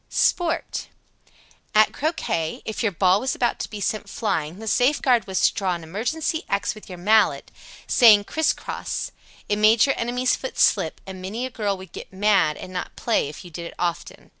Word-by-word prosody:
SPORT. 340 Hz, -1 st, 0 dB, 0.9 s
91. 215 Hz, -, +8 dB
At -, -, -6 dB
croquet, 280 Hz, -, -2 dB
if 220 Hz, -, -4 dB
your 225 Hz, -3 st, +1 dB
ball 185 Hz, +2 st, +3 dB
was 260 Hz, +4 st, -1 dB
about 240 Hz, -, 0 dB
to -, -, -4 dB
be 210 Hz, -, -7 dB
sent 210 Hz, +2 st, -2 dB
flying, 165 Hz, -7 st, -2 dB
the 220 Hz, +1 st, -8 dB
safeguard 250 Hz, -1 st, +2 dB
was 190 Hz, -1 st, -1 dB
to -, -, -2 dB
draw 190 Hz, -4 st, -1 dB
an 170 Hz, -, -8 dB
imaginary 250 Hz, -, -2 dB
X 200 Hz, -2 st, 0 dB
with 215 Hz, -, -14 dB
your 180 Hz, -, -7 dB
mallet, 215 Hz, +4 st, +2 dB, 0.3 s
saying, 215 Hz, -5 st, +6 dB
"Criss 315 Hz, +9 st, +1 dB
cross." -, -, -5 dB, 0.4 s
It 205 Hz, -, 0 dB
made 215 Hz, +1 st, +5 dB
your 275 Hz, -, +2 dB
enemy's 250 Hz, +2 st, +1 dB
foot -, -, -7 dB
slip, -, -, +2 dB
and 190 Hz, -1 st, -8 dB
many 215 Hz, +7 st, -4 dB
a 260 Hz, -, -6 dB
girl 205 Hz, -4 st, -2 dB
would 185 Hz, -2 st, -12 dB
get -, -, -9 dB
"mad" 195 Hz, -6 st, +2 dB
and 185 Hz, -, -9 dB
not 180 Hz, -, -5 dB
play, 225 Hz, -11 st, 0 dB
if 150 Hz, -, -10 dB
you 175 Hz, -, -11 dB
did 170 Hz, +1 st, -6 dB
it -, -, -12 dB
often. 170 Hz, -1 st, -4 dB
210 Hz, 200 wpm, -23 LUFS, 185-240 Hz, 0.9 s, 91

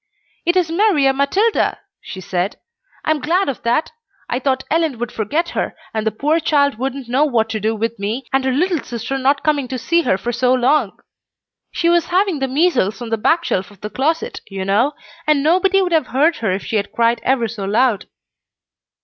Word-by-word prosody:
"It 345 Hz, +2 st, +3 dB
is 345 Hz, -3 st, +1 dB
Maria 330 Hz, -8 st, +3 dB
Matilda," 380 Hz, +12 st, +1 dB, 0.2 s
she 190 Hz, -, -8 dB
said, 185 Hz, +3 st, -2 dB, 0.5 s
"I'm 310 Hz, -1 st, +1 dB
glad 355 Hz, +8 st, +1 dB
of 275 Hz, -, -3 dB
that. 240 Hz, +7 st, 0 dB, 0.4 s
I 245 Hz, -, -1 dB
thought 265 Hz, 0 st, 0 dB
Ellen 320 Hz, -5 st, +1 dB
would 240 Hz, 0 st, -4 dB
forget 300 Hz, -, -1 dB
her, -, -, -3 dB, 0.2 s
and 220 Hz, 0 st, -2 dB
the -, -, +2 dB
poor 300 Hz, +9 st, +1 dB
child 285 Hz, -5 st, +1 dB
wouldn't 270 Hz, 0 st, -3 dB
know 255 Hz, +5 st, +2 dB
what 235 Hz, -7 st, +1 dB
to 220 Hz, -1 st, -2 dB
do 220 Hz, +2 st, 0 dB
with 225 Hz, 0 st, -3 dB
me 220 Hz, +6 st, -3 dB
and 270 Hz, 0 st, +2 dB
her 265 Hz, -, +1 dB
little 340 Hz, +5 st, +1 dB
sister 245 Hz, +3 st, -4 dB
not 275 Hz, +2 st, +1 dB
coming 295 Hz, -4 st, +1 dB
to 255 Hz, -, -4 dB
see 335 Hz, +7 st, +1 dB
her 190 Hz, -, +1 dB
for 235 Hz, +5 st, -3 dB
so 250 Hz, +2 st, +2 dB
long. 255 Hz, +5 st, +1 dB, 0.7 s
She 335 Hz, -, -1 dB
was 340 Hz, -1 st, +3 dB
having 370 Hz, -3 st, +1 dB
the 270 Hz, -, 0 dB
measles 265 Hz, -, +1 dB
on 235 Hz, -2 st, -7 dB
the -, -, +3 dB
back 335 Hz, +10 st, +2 dB
shelf 185 Hz, 0 st, -1 dB
of 205 Hz, -2 st, -19 dB
the 210 Hz, -, -6 dB
closet, 325 Hz, -, -1 dB
you 195 Hz, -1 st, -4 dB
know, 225 Hz, +9 st, +2 dB, 0.3 s
and 300 Hz, -2 st, +3 dB
nobody 375 Hz, +4 st, +3 dB
would 360 Hz, -, -2 dB
have 315 Hz, -5 st, +2 dB
heard 300 Hz, +6 st, +2 dB
her 220 Hz, -4 st, -1 dB
if 190 Hz, +2 st, -3 dB
she 220 Hz, -, -1 dB
had 200 Hz, -1 st, -2 dB
cried 235 Hz, 0 st, +2 dB
ever 250 Hz, -3 st, +1 dB
so 210 Hz, -3 st, -6 dB
loud." 220 Hz, +1 st, +1 dB
270 Hz, 210 wpm, -19 LUFS, 225-320 Hz, 0.7 s, It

